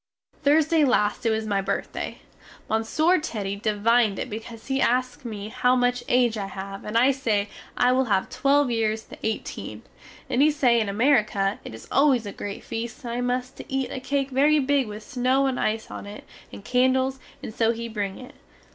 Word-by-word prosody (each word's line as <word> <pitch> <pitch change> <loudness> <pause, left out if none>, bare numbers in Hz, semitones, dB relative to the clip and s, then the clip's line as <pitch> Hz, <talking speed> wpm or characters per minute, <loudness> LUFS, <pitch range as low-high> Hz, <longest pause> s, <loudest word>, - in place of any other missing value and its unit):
Thursday 310 +2 +4
last 230 -4 +2
it - - +4
was 220 0 0
my 200 -2 0
birthday. 195 +1 -3 0.5
Monsieur 310 +11 +2
Teddy 205 -9 -3
devined 215 0 +2
it - - -4
because 225 +1 -8
he 270 -1 -1
ask 255 +2 +1
me 215 -3 -6
how 250 +3 +2
much 245 0 +1
age 240 -3 +3
I 195 - -3
have 195 +1 -7
and 210 +2 -1
I 255 +4 +5
say 220 -7 0 0.3
I 250 0 +4
will 260 +1 +2
have 195 -5 +1
twelve 280 -1 +2
years 220 -1 0
the - - -13
18, 220 0 -4 0.4
and 250 - +1
he 300 - +6
say 255 -6 +3
in 210 - -1
Amerique 215 +1 +2
it 195 - -2
is 110 - -12
always 270 -5 +3
a 200 - -5
great 200 0 -6
feast 230 +4 -5
and 235 -1 -4
I 245 - -2
must 250 +1 -2
to - - -10
eat 270 -1 -1
a - - -4
cake 275 +1 -1
very 290 +4 +4
big 280 -2 +2
with 210 +1 -8
snow 255 +3 +1
and 265 -2 -1
ice 220 +1 -1
on - - -7
it 205 +1 -9 0.3
and 200 - -11
candles, 260 +1 +2 0.2
and - - -6
so 225 0 +2
he 235 0 -5
bring 205 -4 -3
it. 250 - -11
240 Hz, 200 wpm, -25 LUFS, 215-265 Hz, 0.5 s, he